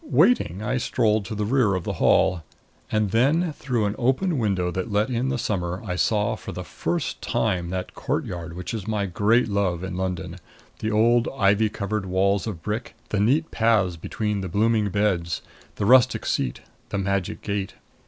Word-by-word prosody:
Waiting, 110 - +2
I 125 +4 0
strolled 110 -3 +1
to 110 - -5
the 105 0 -1
rear 115 -4 +2
of 90 - -2
the - - -3
hall. 90 -2 +4 0.5
And 110 -2 +1
then, 150 - +2
through 125 -7 -1
an 100 - 0
open 135 +6 +1
window 95 -5 0
that 95 +5 -3
let 105 +5 +1
in 125 +2 0
the 130 - 0
summer, 90 -6 -2
I 90 -3 -2
saw 105 +3 +1
for 105 - -8
the 90 - -6
first 155 - -3
time 95 -8 0
that 95 0 -4
courtyard 85 -1 -3
which 90 +3 -5
is 110 -3 -5
my 105 -2 0
great 105 +6 +2
love 95 -4 0
in 95 -1 -4
London 90 -1 -3 0.4
the 110 - -2
old 115 +2 +3
ivy 105 0 +3
covered 105 -1 -3
walls 95 +2 +1
of 90 -7 -5
brick; 110 +7 -4
the 105 - 0
neat 140 +10 +2
paths 110 -6 +2
between 105 +4 -3
the 95 - -4
blooming 110 +2 +2
beds; 95 -4 0 0.3
the 100 - -2
rustic 125 +2 +5
seat; 65 -3 -1 0.3
the 100 - -2
magic 100 -1 -2
gate. 100 -2 -3
105 Hz, 185 wpm, -24 LUFS, 95-115 Hz, 0.5 s, rustic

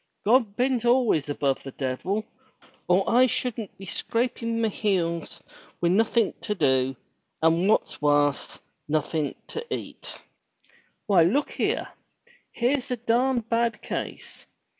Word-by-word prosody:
'*God 225 -2 +3
ben't 250 0 +1
aFays 240 - +2
above 140 -1 0
the 135 - -8
devil, 180 +11 -2 0.6
or 180 +2 +3
I 250 +2 +5
shoo'n't 230 -3 -3
be 195 - -10
scrapin' 230 +3 -2
my 225 - +2
heels 180 -6 -1 0.4
wi' 170 - +2
nothin' 225 +2 +2
to 210 - -2
do, 130 -5 +2 0.5
and, 165 +4 +3
what's 215 - +1
warse, 145 -1 +2 0.3
nothin* 155 0 -1
to 460 - -4
eat. - - -6 0.9
Why, 195 -4 +5
look 220 - +2
heer. - - -1 0.6
Heer's 250 +2 0
a 250 - -1
darned 240 +1 +1
bad 235 0 0
case. - - -6
210 Hz, 125 wpm, -26 LUFS, 165-235 Hz, 0.9 s, I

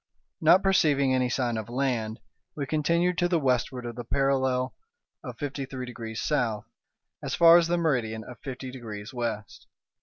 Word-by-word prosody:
Not 175 +4 +6
perceiving 145 -8 +3
any 125 -1 +1
sign 120 -2 -1
of 110 0 -5
land, 120 -4 -2 0.3
we 145 - -3
continued 170 +4 +1
to 175 - +3
the 175 -1 +2
westward 125 -3 0
of 120 -1 -5
the 120 - -6
parallel 130 0 +1 0.5
of - - -7
fifty 140 -1 -4
three 130 -1 -6
degrees 115 -2 -7
south, 120 -8 0 0.6
as - - -3
far 170 0 +8
as 170 - 0
the 175 +1 +1
meridian 120 -9 0
of 120 0 -11
fifty 130 -1 -7
degrees 110 -2 -8
west. 115 -4 -5
130 Hz, 170 wpm, -27 LUFS, 120-150 Hz, 0.6 s, far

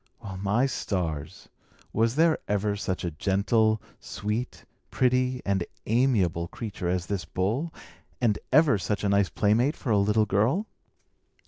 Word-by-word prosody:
Well, 95 -1 -7
my 100 +7 +1
stars! 85 - -3 0.5
was 115 +2 +2
there 160 +1 +3
ever 105 0 0
such 95 -3 -3
a 85 - -2
gentle, 110 +6 +2 0.2
sweet, 105 +4 -4 0.2
pretty, 125 0 +1
and 100 -2 +1 0.2
amiable 105 -9 +2
creature 100 -3 -5
as 90 -1 -1
this 100 -2 -3
bull, 105 - -1 0.5
and 115 -5 +1
ever 140 -6 +5
such 105 +2 -2
a 100 - +1
nice 100 -1 +3
playmate 115 +8 +2
for 120 - -3
a 105 - +4
little 105 +2 +3
girl? 110 - +1
105 Hz, 140 wpm, -27 LUFS, 95-125 Hz, 0.5 s, ever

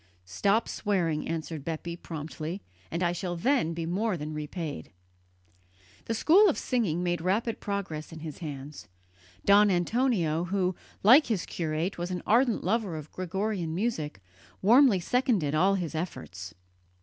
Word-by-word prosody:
"Stop 200 - +1
swearing," 175 -7 -1
answered 160 -2 -4
Bepi 165 +2 -4
promptly, 160 +2 -6 0.3
"and 170 +2 -2
I 175 - +2
shall 175 0 -3
then 190 - +1
be 165 -1 -3
more 190 +3 0
than 155 0 -5
repaid." 150 - -5 1.2
The 230 - -2
school 380 - +6
of 315 - 0
singing 195 - 0
made 175 -1 0
rapid 210 +6 0
progress 180 -7 -4
in 160 -1 -9
his 155 -3 -7
hands. 145 -2 -7 0.6
Don 205 +1 +6
Antonio, 175 -4 +1
who, 185 0 0 0.3
like 255 +9 +7
his 215 -7 -1
curate, 165 +2 -2
was 175 +1 -3
an 180 -1 -4
ardent 235 +1 +3
lover 195 -3 0
of 155 0 -9
Gregorian 185 -2 -2
music, 165 - -2 0.4
warmly 235 0 +6
seconded 215 - +1
all 190 +6 +3
his 175 -5 -3
efforts. 125 - -6
175 Hz, 145 wpm, -28 LUFS, 160-210 Hz, 1.2 s, like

